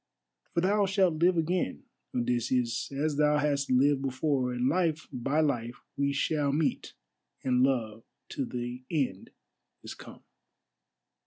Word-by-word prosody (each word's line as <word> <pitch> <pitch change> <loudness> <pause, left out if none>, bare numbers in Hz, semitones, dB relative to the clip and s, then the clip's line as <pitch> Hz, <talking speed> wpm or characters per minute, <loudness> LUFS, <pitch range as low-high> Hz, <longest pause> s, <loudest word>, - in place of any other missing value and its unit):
For 170 - +3
thou 200 +2 +2
shalt 185 -5 +2
live 175 0 +4
again, 165 - -1 0.3
Odysseus, 120 0 0
as 145 +1 -1
thou 150 0 +4
hast 145 -1 0
lived 135 +2 +3
before, 135 -1 0
and 125 +1 0
life 160 0 0
by 135 +5 0
life 120 -5 -2
we 140 0 +1
shall 145 0 0
meet 150 +2 -1 0.5
and 125 -1 +2
love 115 -5 +1 0.3
till 135 - -3
the 125 0 -5
end 135 - -2 0.5
is - - -7
come." - - -13
140 Hz, 135 wpm, -29 LUFS, 125-155 Hz, 0.5 s, live